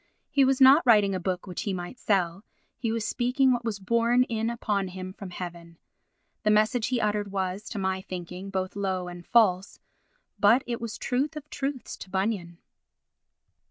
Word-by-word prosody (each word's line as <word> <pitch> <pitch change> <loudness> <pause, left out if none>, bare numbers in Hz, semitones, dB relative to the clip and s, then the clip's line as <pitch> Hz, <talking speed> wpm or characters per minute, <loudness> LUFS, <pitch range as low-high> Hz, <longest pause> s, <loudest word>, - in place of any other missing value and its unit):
He 280 - +4
was 265 0 +3
not 270 +4 +8
writing 210 -5 +5
a 185 - -1
book 180 0 -3
which 180 -3 -5
he 200 - -2
might 180 +7 -6
sell, 190 -2 0 0.4
he 230 -3 -1
was 225 -1 -2
speaking 260 +2 +2
what 240 -1 0
was 225 -3 -2
borne 235 +5 +2
in 225 -2 -2
upon 210 -4 -1
him 185 0 -7
from 195 -1 -9
heaven. 170 -2 -8 0.6
The 215 - +1
message 215 +2 +3
he 250 -2 0
uttered 210 -2 -1
was, 190 +1 -3
to - - -6
my 190 -1 -1
thinking, 180 +1 -7
both 190 -1 -3
low 190 -3 -2
and 175 0 -8
false, 195 -3 +2 0.6
but 225 +6 +5
it 235 -1 -4
was 230 -1 -5
truth 275 +4 -1
of 300 -1 -8
truths 275 -2 -4
to - - -10
Bunyan. 190 -3 -2
205 Hz, 180 wpm, -27 LUFS, 185-235 Hz, 0.6 s, not